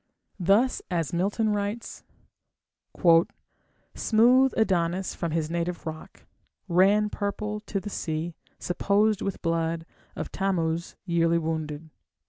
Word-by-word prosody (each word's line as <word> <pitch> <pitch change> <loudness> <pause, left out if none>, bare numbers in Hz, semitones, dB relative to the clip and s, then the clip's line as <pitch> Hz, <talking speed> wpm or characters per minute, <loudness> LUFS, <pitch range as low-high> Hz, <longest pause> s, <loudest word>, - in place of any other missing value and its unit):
Thus 200 +8 +3
as 170 -2 -1
Milton 205 +5 +1
writes: 205 +3 -4 1.9
Smooth 250 +4 +4
Adonis 185 -3 +1
from 170 - -3
his 160 0 -1
native 170 0 -2
rock 160 -1 -8 0.4
Ran 200 +4 +4
purple 210 +1 -3
to 210 -1 -4
the 205 +1 -7
sea, 160 0 -3 0.2
supposed 200 +3 +1
with 195 - -4
blood 165 0 -1 0.3
Of - - -4
Thammuz 170 -4 -1
yearly 170 -1 +2
wounded. 160 -1 -3
180 Hz, 105 wpm, -26 LUFS, 165-205 Hz, 1.9 s, Smooth